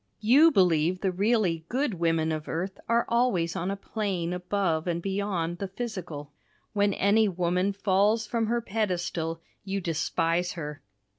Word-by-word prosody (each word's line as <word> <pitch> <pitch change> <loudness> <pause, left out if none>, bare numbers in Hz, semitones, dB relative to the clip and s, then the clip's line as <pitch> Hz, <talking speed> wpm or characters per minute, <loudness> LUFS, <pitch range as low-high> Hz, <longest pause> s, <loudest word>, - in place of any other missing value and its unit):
You 270 +10 +6
believe 180 - +2
the 190 - +1
really 190 -4 +1
good 260 -1 0
women 165 -2 +1
of 155 -1 -4
earth 185 +4 -3
are 235 0 +3
always 230 -9 +1
on 175 +3 -2
a 200 - -1
plane 195 -4 -3
above 180 -2 -1
and 170 -1 0
beyond 190 -3 -2
the 195 - -3
physical. 185 - -6 0.4
When 205 -1 +2
any 210 +2 +3
woman 180 +2 0
falls 200 +3 +2
from 225 0 -1
her 235 +1 0
pedestal 175 -6 -2 0.2
you 195 0 -2
despise 170 +1 0
her. 150 -4 -6
185 Hz, 150 wpm, -27 LUFS, 170-210 Hz, 0.4 s, You